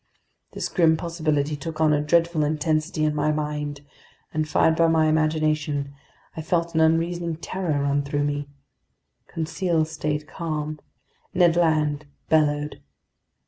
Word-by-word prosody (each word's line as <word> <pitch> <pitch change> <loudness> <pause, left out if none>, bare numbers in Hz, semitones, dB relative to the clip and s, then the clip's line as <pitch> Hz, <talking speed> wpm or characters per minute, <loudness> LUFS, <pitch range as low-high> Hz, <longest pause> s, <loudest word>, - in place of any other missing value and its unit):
This - - -3
grim 160 -3 +3
possibility 155 -3 -1
took 155 +2 -7
on 155 -1 +4
a 145 - +2
dreadful 165 +1 +2
intensity 155 +1 0
in 150 - +1
my 150 +1 +1
mind, 150 -1 -3 0.5
and 155 0 -1
fired 160 +2 +3
by 165 0 +4
my 160 -1 +3
imagination, 155 -2 0 0.4
I 160 - -4
felt 170 +1 -1
an 160 - +2
unreasoning 165 +1 +1
terror 165 -3 -2
run 140 0 +1
through 145 +1 -1
me. 145 0 -2 0.8
Conseil 165 0 -1
stayed 155 -1 -3
calm. 155 -3 -4 0.6
Ned 175 -2 +4
Land 155 -3 +1 0.2
bellowed. 150 -1 +1
155 Hz, 135 wpm, -24 LUFS, 150-165 Hz, 0.8 s, on